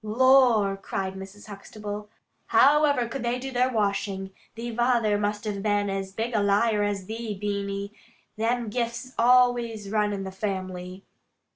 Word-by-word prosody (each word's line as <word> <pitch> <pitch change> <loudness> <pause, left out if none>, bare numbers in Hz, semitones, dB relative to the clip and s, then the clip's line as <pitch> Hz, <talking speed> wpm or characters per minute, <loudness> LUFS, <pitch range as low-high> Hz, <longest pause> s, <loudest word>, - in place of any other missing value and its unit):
'" - - -47
"Lor," 230 -3 +4
cried 195 -1 -4
Mrs. 195 +2 -10
Huxtable, 210 0 -8 0.4
"however 285 -3 +4
could 270 +4 -5
they 240 +1 -1
do 265 +1 -6
their 250 0 +2
washing? 200 -3 -1 0.2
Thee 235 +1 -5
vayther 240 -3 +2
must 205 +1 -2
a 210 - -1
been 205 -1 0
as 195 0 -3
big 225 +4 -3
a 215 - +2
liar 205 +2 +2
as 205 -2 -1
thee, 220 0 -5
Beany. 200 0 -3 0.4
Them 230 +1 -1
gifts 235 +3 -3
always 240 -4 +3
runs 210 -1 +1
in 195 - -5
the 190 - -6
family." 185 -1 -5
210 Hz, 155 wpm, -26 LUFS, 200-235 Hz, 0.4 s, Lor